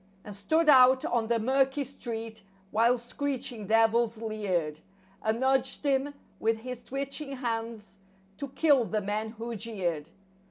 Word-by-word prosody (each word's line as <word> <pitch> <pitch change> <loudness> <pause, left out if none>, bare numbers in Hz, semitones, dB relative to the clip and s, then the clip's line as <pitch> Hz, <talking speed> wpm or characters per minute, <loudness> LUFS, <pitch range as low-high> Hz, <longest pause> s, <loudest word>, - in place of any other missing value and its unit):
And 205 -2 -9
stood 315 +11 +1
out 260 -2 +7
on 235 -2 0
the 235 0 +2
murky 270 +4 +1
street 230 -4 -7 0.3
while 230 +3 +3
screeching 240 -3 -4
devils 225 +1 +3
leered, 190 -9 -2 0.4
And 225 +3 0
urged 265 +1 +1
him 280 +1 +1 0.2
with 220 0 0
his 250 0 -6
twitching 275 +1 -4
hands 225 -5 -4 0.4
to 280 - -4
kill 275 -2 +3
the 215 -1 -1
men 210 +2 -2
who 230 +1 -5
jeered. 180 -8 -3
230 Hz, 135 wpm, -29 LUFS, 220-265 Hz, 0.4 s, out